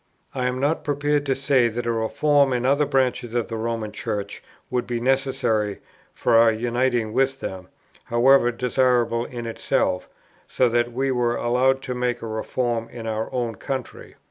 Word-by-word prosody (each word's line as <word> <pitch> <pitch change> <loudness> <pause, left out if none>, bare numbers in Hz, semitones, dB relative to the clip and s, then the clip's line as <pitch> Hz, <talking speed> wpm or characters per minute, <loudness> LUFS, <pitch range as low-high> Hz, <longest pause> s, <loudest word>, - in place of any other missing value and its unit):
I 125 -1 -1
am 125 0 -2
not 145 +4 0
prepared 145 0 0
to 135 - +2
say 135 -3 +3
that 115 +1 -4
a 120 - +1
reform 135 +5 +2
in 125 0 -1
other 140 +2 +3
branches 125 -3 0
of 120 -1 -1
the 115 - -4
Roman 115 -1 -3
Church 100 -1 -4 0.3
would 125 -1 -1
be 120 -1 -2
necessary 125 -5 0 0.3
for - - 0
our 115 0 +6
uniting 120 0 0
with 135 +1 +1
them, 95 -1 -6 0.4
however 120 +1 +4
desirable 120 -1 +1
in 120 -2 -7
itself, 115 - -1 0.4
so 130 - +2
that 120 +1 +1
we 135 +3 -1
were 120 -2 +1
allowed 130 +2 +1
to 125 - -3
make 125 -1 -2
a - - -4
reform 115 +1 -2
in 120 -2 -8
our 110 0 -3
own 120 -2 -2
country. 130 0 -6
120 Hz, 170 wpm, -23 LUFS, 115-130 Hz, 0.4 s, our